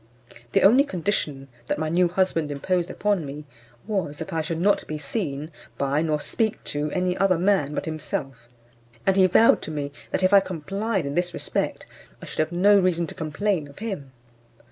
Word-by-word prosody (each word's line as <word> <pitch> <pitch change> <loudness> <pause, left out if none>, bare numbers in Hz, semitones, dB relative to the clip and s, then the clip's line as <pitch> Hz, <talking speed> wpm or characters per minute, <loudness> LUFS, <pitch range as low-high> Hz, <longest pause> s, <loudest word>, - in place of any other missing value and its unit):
The - - +4
only 245 +8 +7
condition 165 - -2 0.2
that - - 0
my 155 +1 -1
new 175 +3 +3
husband 175 -3 0
imposed 175 +5 -1
upon 205 -4 0
me 145 +1 -7 0.4
was, 190 -9 -2
that 160 - -6
I 160 - +1
should 160 +1 -3
not 200 +3 +2
be 155 - -4
seen 150 -1 -3 0.3
by 140 +2 +1
nor 155 -2 0
speak 220 +7 -1
to 150 +1 -1
any 180 +2 0
other 185 -2 +3
man 175 -5 +1
but - - -2
himself, 135 -6 -5 0.6
and 195 - +3
he 190 -1 +6
vowed 225 +5 +5
to - - -6
me 145 -2 -3 0.2
that, - - -1
if 185 +2 +3
I 200 - +10
complied 195 +2 -2
in 140 - -3
this 175 +2 -1
respect, - - -2 0.3
I - - -9
should - - -8
have 155 - +1
no 200 +4 +5
reason 175 -2 +1
to - - -8
complain 160 +1 -1
of 140 - -16
him. 190 -11 -5
170 Hz, 190 wpm, -24 LUFS, 150-195 Hz, 0.6 s, I